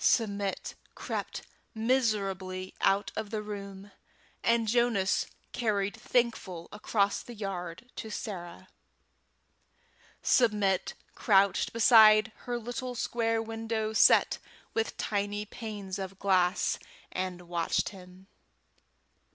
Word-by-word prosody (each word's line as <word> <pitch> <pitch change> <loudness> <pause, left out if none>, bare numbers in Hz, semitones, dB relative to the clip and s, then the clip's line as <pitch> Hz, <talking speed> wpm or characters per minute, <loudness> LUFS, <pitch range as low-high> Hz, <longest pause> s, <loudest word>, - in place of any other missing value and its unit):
Submit 200 -4 +1 0.2
crept - - -4 0.3
miserably 200 -6 0
out 195 +1 +2
of 220 -1 -3
the 215 -1 -3
room, 200 -1 -8 0.5
and 230 -1 +2
Jonas 225 -4 +2 0.2
carried 205 -4 0
Thankful 205 -8 -1
across 205 -1 0
the 240 - -10
yard 195 +2 -6
to 220 - -5
Sarah. 185 -5 -6 1.5
Submit 210 -6 +2 0.2
crouched 195 -2 +3
beside 220 -1 +7 0.2
her 245 0 -1
little 245 +2 -5
square 225 -1 0
window 225 -1 -3
set - - +5 0.3
with 225 0 -1
tiny 205 0 -2
panes 205 -3 -6
of 190 0 -6
glass, 185 -1 +2 0.3
and 185 -1 -4
watched 170 -1 0
him. 185 -1 -14
205 Hz, 100 wpm, -30 LUFS, 190-225 Hz, 1.5 s, beside